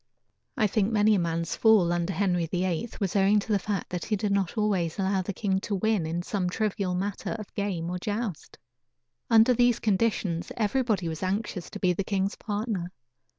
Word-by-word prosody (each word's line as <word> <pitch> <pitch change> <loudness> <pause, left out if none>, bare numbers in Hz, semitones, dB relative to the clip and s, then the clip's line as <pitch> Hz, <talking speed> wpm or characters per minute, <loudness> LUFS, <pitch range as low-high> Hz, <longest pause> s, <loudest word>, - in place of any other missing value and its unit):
I 220 - +3
think 210 +1 +1
many 215 0 +4
a 200 - +3
man's 165 -1 -1
fall, 210 -6 +4
under 175 +1 -1
Henry 180 -2 0
VIII, 180 +4 -1
was 195 -2 -1
owing 200 +1 +4
to 210 - -5
the 205 - +3
fact 200 -2 -3
that 180 -1 -3
he 215 - 0
did 205 0 -1
not 200 +1 0
always 190 -6 0
allow 190 -1 +1
the 185 - -4
king 190 -1 0
to 200 +1 -3
win 205 -4 +1
in 170 +2 -2
some 185 -2 -1
trivial 200 -2 -1
matter 200 +2 -3
of 215 -2 -9
game 190 -5 -2
or 180 - -3
joust. 205 -2 -4 0.7
Under 230 +2 +6
these 245 -1 +3
conditions 195 -5 0
everybody 220 -4 +1
was 160 -1 -4
anxious 190 -1 -2
to 205 - -8
be 180 -2 +2
the 195 - -2
king's 195 0 -1
partner. 205 -4 -3
195 Hz, 195 wpm, -27 LUFS, 180-215 Hz, 0.7 s, Under